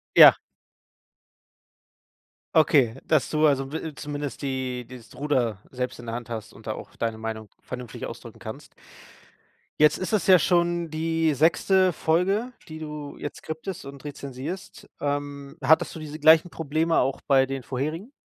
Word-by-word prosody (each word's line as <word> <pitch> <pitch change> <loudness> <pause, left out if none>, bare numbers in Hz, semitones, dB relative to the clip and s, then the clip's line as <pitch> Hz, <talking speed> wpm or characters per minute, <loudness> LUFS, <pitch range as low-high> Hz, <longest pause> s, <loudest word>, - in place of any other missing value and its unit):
Ja. - - +11 2.2
Okay, 140 -7 +5
dass 155 -4 +2
du, 155 0 +2
also, 135 -1 0
w - - -3
äh, 160 -2 -5
zumindest 145 -2 -5
die 130 -3 -3
dieses 125 -3 -12
Ruder 125 -6 0
selbst 125 -1 -4
in 120 - -9
der 115 0 -4
Hand 120 -1 -6
hast 110 -3 -6
und - - -14
da - - 0
auch - - -8
deine 115 -1 -2
Meinung 110 -1 -5
vernünftig 125 -3 -7
ausdrücken - - -10
kannst? - - -9 1.1
Jetzt 150 0 +5
ist 185 0 -4
es 210 - +2
ja 185 -1 +8
schon 175 -1 +2
die 160 0 +1
6. 185 +5 +3
Folge, 195 +10 +1 0.2
die 155 0 -7
du 150 -2 -7
jetzt 145 - -6
scriptest 165 +4 -6
und 140 +1 -11
rezensierst. 145 +6 -7
Ähm, 145 -1 -3
hattest 160 - +4
du 160 - -7
diese 155 0 -7
gleichen 160 +2 +6
Probleme 160 +1 0
auch 135 +1 0
bei 135 -1 +5
den 135 0 -4
vorherigen? 155 - -4
145 Hz, 160 wpm, -25 LUFS, 130-160 Hz, 2.2 s, Ja